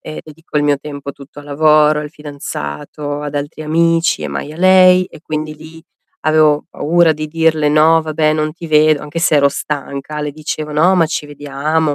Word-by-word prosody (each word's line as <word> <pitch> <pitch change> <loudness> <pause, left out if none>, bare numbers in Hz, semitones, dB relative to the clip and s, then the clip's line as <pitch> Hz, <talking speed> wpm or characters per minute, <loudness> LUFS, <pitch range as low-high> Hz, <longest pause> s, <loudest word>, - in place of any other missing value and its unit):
e 155 - -8
dedico 155 0 -9
il 145 - +2
mio 145 -1 +2
tempo 140 -1 -8
tutto 140 +1 -15
al 145 - -10
lavoro, 150 +1 +3
al 150 -1 -7
fidanzato, 145 - -6
ad 145 -1 -5
altri 145 +2 -5
amici 165 - +1
e 75 - -3
mai 70 - -5
a - - -11
lei. 185 0 +5
E 170 - -14
quindi 155 -1 -4
lì, 160 +1 -13 0.4
avevo 155 -1 +3
paura 170 +1 +2
di 155 0 -6
dirle: 160 -1 +1
"No 160 +2 +4
vabbè 155 0 0
non 155 0 -1
ti 170 +1 -10
vedo." 155 -1 +3
Anche 150 +3 -5
se 160 -2 +3
ero 140 -1 +4
stanca. 145 +1 -5
Le 150 -1 -4
dicevo: 155 0 -5
"No 165 +6 +3
ma 165 -2 +3
ci 150 -1 -4
vediamo, 145 +2 -2
155 Hz, 195 wpm, -16 LUFS, 145-160 Hz, 0.4 s, lei